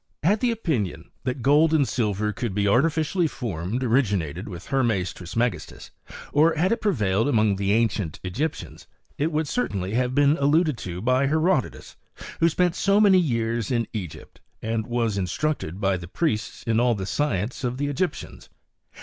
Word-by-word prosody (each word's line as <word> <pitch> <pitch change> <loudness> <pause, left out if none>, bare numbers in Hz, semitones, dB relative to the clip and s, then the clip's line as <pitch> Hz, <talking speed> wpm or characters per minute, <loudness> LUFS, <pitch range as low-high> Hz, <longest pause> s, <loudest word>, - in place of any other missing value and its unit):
Had 205 +7 +2
t&e 250 - +2
opinion, 120 - -2
that 125 -1 -3
gold 150 +3 +4
and 140 -4 +3
silver 105 -2 -1
could 110 -2 -4
be 105 - +1
aiw 105 +5 +4
tificially 160 +2 0
formed 110 - -4
originated 105 - 0
with 90 -3 -8
Hermes 110 -10 0
Trismegistui, 110 +4 -3 0.4
or 160 +3 +4
had 175 +4 +1
it 230 - 0
prevailed 110 - +1
among 110 -6 +2
the 100 0 0
ancient 105 -7 0
Egyptians^ 140 - -4 0.3
it 155 +3 +1
would 155 0 -1
certainly 100 - -2
have 125 +1 0
been 145 +2 +4
alluded 150 +2 +2
to 90 -1 -6
by 130 +3 +2
Herodotus, 155 -2 0 0.4
who 165 - +4
spent 175 +1 +1
so 200 +3 +2
many 200 -3 +6
years 115 - -1
in 120 -2 0
Egypt, 85 -8 -7 0.2
and 110 0 -2
was 115 -4 0
instructed 95 - -2
by 95 -2 +1
the 85 -1 -9
priests 110 - -2
in 115 -1 +1
all 120 -1 +3
the 95 -2 -4
science 120 0 -2
of 125 0 -2
the 145 - -1
Egyptians. 145 +6 -4
120 Hz, 165 wpm, -24 LUFS, 100-150 Hz, 0.4 s, many